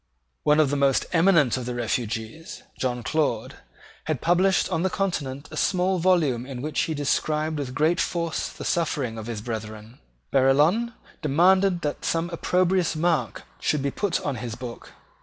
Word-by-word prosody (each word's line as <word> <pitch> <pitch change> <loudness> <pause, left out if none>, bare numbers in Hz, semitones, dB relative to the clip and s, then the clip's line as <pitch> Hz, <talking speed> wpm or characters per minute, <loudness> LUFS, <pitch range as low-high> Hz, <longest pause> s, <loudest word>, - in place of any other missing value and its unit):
One 150 +1 +3
of 150 -3 +3
the - - +1
most 140 -1 +2
eminent 165 -8 +4
of 125 -1 -5
the 125 - -3
refugees, 115 +5 -4 0.2
John 125 -2 -1
Claude, 145 -8 -1 0.5
had 155 -5 -1
published 180 +2 +3
on 160 - 0
the 190 - +1
Continent 150 -8 -3
a - - -7
small 185 +3 +1
volume 165 -9 +2
in 130 -1 -7
which 155 0 -2
he 160 - 0
described 150 +2 0
with 130 -3 -5
great 160 +4 +2
force 170 -2 -2
the - - -9
sufferings 140 -9 -1
of 110 - -7
his 110 -3 -5
brethren. 110 0 -7 0.3
Barillon 155 - +3 0.3
demanded 180 +5 +3
that 150 -2 -3
some 165 +1 -1
opprobrious 180 0 +1
mark 155 - 0 0.2
should 150 -3 0
be 140 - 0
put 200 +2 -1
on 140 -4 -2
his 115 0 -5
book. 120 -1 -9
150 Hz, 165 wpm, -25 LUFS, 125-170 Hz, 0.5 s, eminent